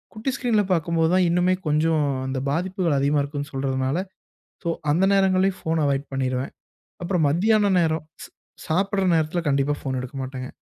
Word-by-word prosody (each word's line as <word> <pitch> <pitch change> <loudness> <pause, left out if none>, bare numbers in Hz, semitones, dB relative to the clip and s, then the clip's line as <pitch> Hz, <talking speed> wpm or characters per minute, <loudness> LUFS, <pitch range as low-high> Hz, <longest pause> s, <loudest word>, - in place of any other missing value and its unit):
குட்டி 225 +5 -2
ஸ்கிரீன்ல 230 -6 +1
பார்க்கும்போது 165 -1 +1
தான் 185 -1 +4
இன்னுமே 180 +2 +2
கொஞ்சம் 155 0 +2 0.2
அந்த 130 0 -3
பாதிப்புகள் 175 -1 0
அதிகமா 145 +1 +2
இருக்குன்னு 145 +1 -5
சொல்றதனால, 135 +1 -1 0.7
சோ, - - 0 0.2
அந்த 180 +5 +3
நேரங்கள்லையும் 190 -1 +2
ஃபோன 160 -1 0
அவாய்ட் 140 0 -1
பண்ணிருவேன். 130 0 -2 0.5
அப்புறம் 170 -3 +1
மத்தியான 205 +6 +3
நேரம் 160 -2 0 0.2
ச் - - -15 0.4
சாப்பிடுற 195 +4 0
நேரத்தில 160 +2 0
கண்டிப்பா 140 +1 +1
ஃபோன 130 -2 -3
எடுக்க 130 +2 -8
மாட்டேங்க. 130 -1 -6
160 Hz, 155 wpm, -23 LUFS, 140-185 Hz, 0.7 s, தான்